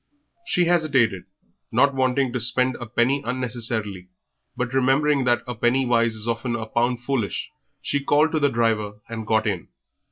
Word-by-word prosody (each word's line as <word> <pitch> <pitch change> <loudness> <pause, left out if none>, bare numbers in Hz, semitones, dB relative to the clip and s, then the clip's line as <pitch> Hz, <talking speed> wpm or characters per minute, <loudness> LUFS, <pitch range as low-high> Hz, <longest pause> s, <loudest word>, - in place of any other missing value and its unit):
She 180 - +2
hesitated, 135 - +2 0.5
not 140 +5 +3
wishing 130 -1 +1
to 125 - -1
spend 125 +2 +2
a 120 - -7
penny 125 +5 +1
unnecessarily, 115 -7 -3 0.5
but 125 0 -2
remembering 135 +1 +2
that 120 -1 +2
a 125 - -4
penny 120 +3 +1
wise 115 -2 +2
is 110 +1 -3
often 115 +1 -1
a 110 -1 -4
pound 120 +2 0
foolish 120 -6 -2 0.3
she 145 -1 -1
called 150 +3 +3
to 155 - +1
the 145 -1 +3
driver 115 -4 0
and 110 -2 -6
got 110 0 +2
in. 100 -5 -2
120 Hz, 165 wpm, -23 LUFS, 115-135 Hz, 0.5 s, not